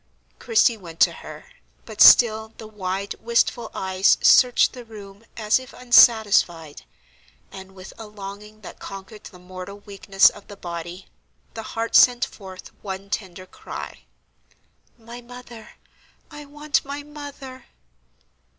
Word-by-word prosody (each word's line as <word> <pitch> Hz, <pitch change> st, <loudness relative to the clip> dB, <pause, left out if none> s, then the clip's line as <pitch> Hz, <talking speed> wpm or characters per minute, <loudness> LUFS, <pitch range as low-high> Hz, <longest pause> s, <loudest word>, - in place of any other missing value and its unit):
Christie 230 Hz, 0 st, +2 dB
went 165 Hz, -5 st, -13 dB
to -, -, +5 dB
her, -, -, -12 dB, 0.4 s
but -, -, -7 dB
still 220 Hz, -2 st, +6 dB
the 220 Hz, -, -10 dB
wide, 200 Hz, -2 st, -5 dB
wistful 235 Hz, 0 st, 0 dB
eyes 190 Hz, +1 st, +1 dB
searched 250 Hz, -1 st, +5 dB
the 250 Hz, -2 st, -10 dB
room 205 Hz, -2 st, -13 dB
as 215 Hz, +1 st, +1 dB
if 260 Hz, +1 st, -13 dB
unsatisfied; 205 Hz, -10 st, +3 dB, 0.7 s
and, 190 Hz, 0 st, -12 dB
with 185 Hz, 0 st, -12 dB
a 220 Hz, -, -9 dB
longing 210 Hz, +1 st, -11 dB
that 190 Hz, -, -12 dB
conquered 195 Hz, +2 st, -11 dB
the 180 Hz, -, -12 dB
mortal 185 Hz, +2 st, -10 dB
weakness 195 Hz, -1 st, +2 dB
of 205 Hz, -, -16 dB
the 205 Hz, -, -12 dB
body, 175 Hz, +1 st, -8 dB, 0.5 s
the 225 Hz, -, -7 dB, 0.2 s
heart 230 Hz, 0 st, -2 dB
sent 245 Hz, -1 st, +5 dB
forth 190 Hz, -2 st, -12 dB
one 195 Hz, 0 st, -8 dB
tender 185 Hz, -3 st, -6 dB
cry: -, -, -10 dB, 0.9 s
"My 235 Hz, +1 st, -12 dB
mother—I 245 Hz, +4 st, -15 dB
want 295 Hz, +1 st, -2 dB
my 285 Hz, +1 st, -7 dB
mother!" 285 Hz, -3 st, -11 dB
215 Hz, 130 wpm, -22 LUFS, 190-240 Hz, 0.9 s, still